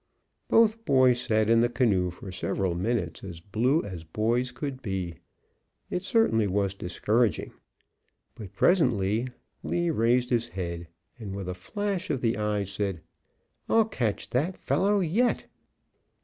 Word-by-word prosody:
Both 225 Hz, 0 st, +4 dB
boys 130 Hz, -, +4 dB
sat 110 Hz, -3 st, +1 dB
in 115 Hz, 0 st, +5 dB
the 120 Hz, +1 st, +3 dB
canoe 110 Hz, -7 st, +2 dB
for 90 Hz, +2 st, -9 dB
several 95 Hz, 0 st, -1 dB
minutes 90 Hz, -2 st, -2 dB
as 90 Hz, -4 st, -7 dB
blue 115 Hz, -, +1 dB
as 90 Hz, -5 st, -7 dB
boys 115 Hz, +9 st, 0 dB
could 130 Hz, +1 st, -5 dB
be. 95 Hz, -, -4 dB, 0.7 s
It 180 Hz, -, -1 dB
certainly 195 Hz, -, +2 dB
was 100 Hz, 0 st, 0 dB
discouraging. 105 Hz, +3 st, 0 dB, 0.8 s
But 100 Hz, -4 st, -10 dB
presently 115 Hz, -, +2 dB, 0.3 s
Lee 175 Hz, -1 st, 0 dB
raised 125 Hz, -1 st, +2 dB
his 120 Hz, -1 st, +1 dB
head, 85 Hz, -4 st, -5 dB, 0.3 s
and 100 Hz, -4 st, -6 dB
with 100 Hz, -2 st, -5 dB
a 90 Hz, -, -2 dB
flash 195 Hz, -, -3 dB
of 130 Hz, -, -1 dB
the 115 Hz, -1 st, +1 dB
eyes 105 Hz, -2 st, -1 dB
said, 100 Hz, -5 st, -3 dB, 0.7 s
"I'll 225 Hz, -1 st, +5 dB
catch 120 Hz, -, -2 dB
that 155 Hz, +9 st, 0 dB
fellow 200 Hz, +1 st, +1 dB
yet!" 205 Hz, +9 st, +1 dB
115 Hz, 140 wpm, -27 LUFS, 95-130 Hz, 0.8 s, in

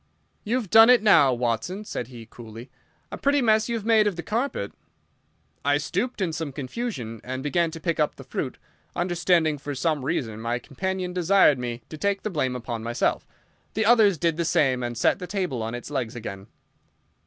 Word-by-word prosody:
"You've 230 Hz, -3 st, -2 dB
done 225 Hz, +1 st, +8 dB
it 250 Hz, -3 st, +6 dB
now, 160 Hz, -10 st, +6 dB
Watson," 125 Hz, -, -2 dB
said 120 Hz, -, -4 dB
he, 120 Hz, -3 st, -11 dB
coolly. 115 Hz, +1 st, -11 dB, 0.4 s
"A -, -, -6 dB
pretty 285 Hz, +1 st, +2 dB
mess 220 Hz, -2 st, +3 dB
you've 230 Hz, -3 st, -2 dB
made 220 Hz, -2 st, +4 dB
of 200 Hz, -, -1 dB
the 170 Hz, -, -6 dB
carpet." 225 Hz, -, -2 dB, 0.9 s
I 145 Hz, 0 st, +3 dB
stooped 200 Hz, +10 st, -2 dB
in 170 Hz, -4 st, 0 dB
some 160 Hz, -2 st, -4 dB
confusion 130 Hz, -, -5 dB
and 130 Hz, +2 st, -5 dB
began 170 Hz, +3 st, +1 dB
to 165 Hz, +1 st, -8 dB
pick 170 Hz, 0 st, -2 dB
up 150 Hz, -, +1 dB
the -, -, -11 dB
fruit, -, -, -4 dB, 0.4 s
understanding 175 Hz, -3 st, +1 dB
for 145 Hz, +1 st, -5 dB
some 150 Hz, 0 st, 0 dB
reason 120 Hz, -7 st, -2 dB
my 120 Hz, +1 st, -1 dB
companion 185 Hz, +7 st, -4 dB
desired 180 Hz, -5 st, +4 dB
me 120 Hz, -1 st, -5 dB
to 155 Hz, -, -9 dB
take 200 Hz, +2 st, 0 dB
the 215 Hz, -, -2 dB
blame 130 Hz, -6 st, -1 dB
upon 120 Hz, -2 st, -5 dB
myself. 115 Hz, +1 st, -1 dB, 0.5 s
The 220 Hz, 0 st, +1 dB
others 215 Hz, -5 st, +5 dB
did 165 Hz, 0 st, 0 dB
the 170 Hz, -, 0 dB
same, 145 Hz, -7 st, +2 dB
and 120 Hz, -1 st, -4 dB
set -, -, +2 dB
the 180 Hz, -, -6 dB
table 180 Hz, -, -2 dB
on 115 Hz, +2 st, -3 dB
its 120 Hz, +4 st, -8 dB
legs 125 Hz, -4 st, -3 dB
again. 100 Hz, -4 st, -7 dB
160 Hz, 190 wpm, -25 LUFS, 125-200 Hz, 0.9 s, done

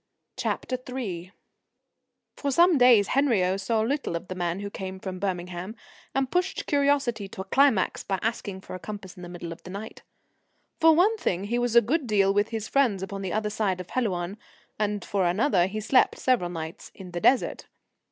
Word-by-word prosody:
III 250 Hz, -9 st, -4 dB, 1.0 s
For 285 Hz, -, -2 dB
some 340 Hz, +2 st, +5 dB
days 240 Hz, -5 st, +6 dB
Henriot 195 Hz, -9 st, +2 dB
saw 220 Hz, +3 st, +1 dB
little 270 Hz, -, -1 dB
of 170 Hz, -, -5 dB
the -, -, -2 dB
man 175 Hz, +1 st, -2 dB
who 200 Hz, 0 st, -5 dB
came 190 Hz, -1 st, -6 dB
from 185 Hz, -1 st, -6 dB
Birmingham 180 Hz, +1 st, -4 dB, 0.4 s
and 270 Hz, -1 st, 0 dB
pushed 360 Hz, +1 st, 0 dB
curiosity 280 Hz, -7 st, +1 dB
to 190 Hz, -, -7 dB
a -, -, -4 dB
climax 250 Hz, -1 st, +2 dB
by 195 Hz, -, -1 dB
asking 205 Hz, -4 st, -3 dB
for -, -, -10 dB
a 185 Hz, -, -5 dB
compass 200 Hz, -2 st, -8 dB
in 180 Hz, -, -12 dB
the 175 Hz, -, -8 dB
middle 175 Hz, -1 st, -7 dB
of 165 Hz, -, -9 dB
the -, -, -11 dB
night. 200 Hz, +4 st, -7 dB, 0.8 s
For 325 Hz, -1 st, +6 dB
one 410 Hz, +7 st, +4 dB
thing, 185 Hz, -, -1 dB
he 235 Hz, +4 st, -1 dB
was 240 Hz, -1 st, 0 dB
a 235 Hz, -, +9 dB
good 275 Hz, +5 st, 0 dB
deal 195 Hz, -2 st, +3 dB
with 205 Hz, +1 st, +2 dB
his 220 Hz, -2 st, -4 dB
friends 235 Hz, -9 st, +2 dB
upon 195 Hz, 0 st, -5 dB
the 190 Hz, -2 st, -3 dB
other 210 Hz, +1 st, -1 dB
side 200 Hz, -4 st, 0 dB
of 180 Hz, -, -8 dB
Helouan, 195 Hz, -5 st, -2 dB, 0.4 s
and 205 Hz, -2 st, -1 dB
for 195 Hz, -2 st, 0 dB
another, 180 Hz, 0 st, +3 dB
he 215 Hz, +3 st, -4 dB
slept 235 Hz, +5 st, +3 dB
several 240 Hz, -9 st, +1 dB
nights 165 Hz, +2 st, -7 dB
in 185 Hz, -2 st, -10 dB
the 175 Hz, 0 st, -4 dB
Desert. 260 Hz, +7 st, +2 dB
205 Hz, 190 wpm, -26 LUFS, 185-250 Hz, 1.0 s, a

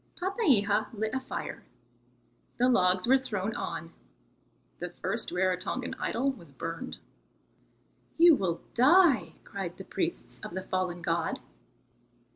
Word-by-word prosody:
Papeiha 265 Hz, -, +2 dB
lit 220 Hz, 0 st, -2 dB
a 265 Hz, -, +1 dB
fire; 260 Hz, -, -6 dB, 1.0 s
the 250 Hz, -, +4 dB
logs 185 Hz, -6 st, +4 dB
were 265 Hz, +2 st, +5 dB
thrown 220 Hz, -5 st, -3 dB
on; -, -, -5 dB, 0.9 s
the -, -, -4 dB
first -, -, -3 dB
Rarotongan 185 Hz, +7 st, -1 dB
idol 270 Hz, +4 st, 0 dB
was 170 Hz, -, -13 dB
burned. 165 Hz, -, -5 dB, 1.2 s
"You 340 Hz, 0 st, +8 dB
will 185 Hz, -, 0 dB
die," 260 Hz, -, +5 dB
cried 190 Hz, -3 st, -6 dB
the 190 Hz, -, -7 dB
priests 120 Hz, -9 st, -2 dB
of 170 Hz, -, -8 dB
the 190 Hz, -, -3 dB
fallen 185 Hz, -2 st, -2 dB
god. 165 Hz, 0 st, 0 dB
200 Hz, 120 wpm, -29 LUFS, 180-260 Hz, 1.2 s, You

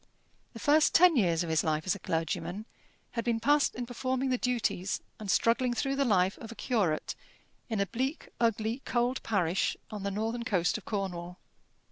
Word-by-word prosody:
The 230 Hz, -, -9 dB
first 295 Hz, +6 st, +4 dB
ten 355 Hz, -1 st, +7 dB
years 175 Hz, -8 st, +2 dB
of 170 Hz, -, -5 dB
his 160 Hz, -, +2 dB
life 155 Hz, -1 st, 0 dB
as 185 Hz, -, +2 dB
a 200 Hz, -, -7 dB
clergyman 170 Hz, +5 st, -2 dB, 0.5 s
had 230 Hz, -, -2 dB
been 230 Hz, -1 st, 0 dB
passed 290 Hz, +4 st, +3 dB
in 245 Hz, -, -3 dB
performing 260 Hz, +2 st, -1 dB
the 255 Hz, -, +2 dB
duties 235 Hz, -7 st, -1 dB, 0.2 s
and 210 Hz, -2 st, -7 dB
struggling 240 Hz, +4 st, +2 dB
through 270 Hz, +3 st, 0 dB
the 280 Hz, -, +2 dB
life 190 Hz, -4 st, +2 dB
of 225 Hz, -, -8 dB
a -, -, -9 dB
curate 200 Hz, -13 st, 0 dB, 0.6 s
in 220 Hz, -3 st, -1 dB
a 200 Hz, -, +2 dB
bleak, 260 Hz, -, -3 dB
ugly, 230 Hz, +2 st, 0 dB
cold 245 Hz, +1 st, 0 dB
parish 190 Hz, -4 st, 0 dB
on 210 Hz, -2 st, -5 dB
the 200 Hz, -, -1 dB
northern 220 Hz, +4 st, -2 dB
coast 185 Hz, -7 st, +1 dB
of -, -, -20 dB
Cornwall. 180 Hz, -4 st, -4 dB
225 Hz, 185 wpm, -30 LUFS, 190-250 Hz, 0.6 s, ten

